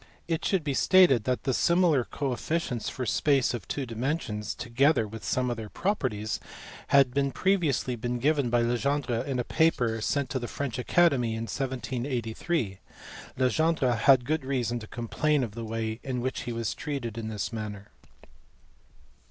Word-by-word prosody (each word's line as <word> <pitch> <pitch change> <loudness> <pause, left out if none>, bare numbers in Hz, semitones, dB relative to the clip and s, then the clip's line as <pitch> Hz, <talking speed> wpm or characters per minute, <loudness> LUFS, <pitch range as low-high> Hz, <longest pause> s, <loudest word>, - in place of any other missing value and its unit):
It 165 -2 -1
should 190 -5 +1
be 145 -2 -1
stated 135 - +5
that 125 -1 0
the 130 - 0
similar 170 -3 +3
coefficients 135 -1 -2
for 130 - -4
space 135 +1 +2
of 120 - -5
two 140 - -3
dimensions, 115 -2 -3
together 130 0 +2
with 110 +1 -9
some 125 -1 0
of 120 - -3
their 110 -2 -6
properties, 125 - -1 0.5
had 135 -3 +5
been 140 0 +1
previously 165 -10 +1
given 125 +4 0
by 120 0 +2
Legendre 120 0 0
in 135 -2 -1
a 125 - 0
paper 120 -8 +1
sent 140 +3 -1
to 130 - -1
the 120 - -4
French 130 -2 -4
Academy 130 -6 +3
in 115 - -3
1783. 125 - -2 0.6
Legendre 130 0 +2
had 125 +2 +5
good 155 +2 0
reason 120 -3 -1
to 110 - -10
complain 125 +6 0
of 110 -4 -4
the 115 +1 -6
way 110 0 -3
in 130 -2 -3
which 130 +2 -2
he 120 - -3
was 115 -2 -2
treated 135 -7 -4
in 115 -1 -4
this 110 +1 -4
matter. 105 -2 -6
125 Hz, 160 wpm, -28 LUFS, 115-140 Hz, 0.6 s, stated